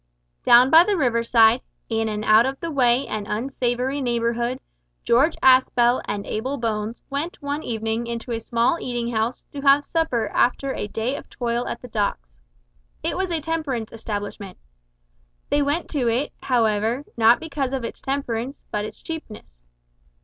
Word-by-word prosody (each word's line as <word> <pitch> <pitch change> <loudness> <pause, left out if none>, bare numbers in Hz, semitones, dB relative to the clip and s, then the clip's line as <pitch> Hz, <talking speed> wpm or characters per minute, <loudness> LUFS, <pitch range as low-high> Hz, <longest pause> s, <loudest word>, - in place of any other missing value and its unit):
Down 245 +2 +7
by 325 +2 +9
the 400 +1 0
river 240 -6 +1
side, 230 +1 +5 0.3
in 225 -1 -1
an 210 0 -3
out 215 +3 +5
of 270 0 -4
the 335 - -4
way 255 -2 +3
and 210 -1 -4
unsavoury 250 +3 -1
neighbourhood, 235 0 -1 0.4
George 275 +8 +3
Aspel 255 -2 +5
and 200 0 -4
Abel 260 +6 -3
Bones 225 -1 -3
went 295 +5 -3
one 285 +1 -3
evening 225 -1 -2
into 235 +1 -5
a 230 - -1
small 235 +8 +1
eating 240 -1 -3
house 225 +3 -1
to 285 - -5
have 280 +1 +5
supper 255 -10 -1
after 265 +5 +1
a - - -4
day 225 +6 -2
of - - -9
toil 240 0 -2
at - - -5
the - - -7
docks. - - -3 0.6
It 330 - -1
was 375 0 -1
a 330 -2 -1
temperance 290 -8 -3
establishment. 205 -3 -6 0.9
They 290 - +3
went 290 +4 0
to 270 -6 0
it, 240 +5 0
however, 230 +1 +1
not 230 +1 +5
because 280 -5 -3
of 265 -2 -3
its 230 - -6
temperance 270 -1 -3
but 210 0 -1
its - - -10
cheapness. 220 - -8
240 Hz, 165 wpm, -23 LUFS, 225-275 Hz, 0.9 s, by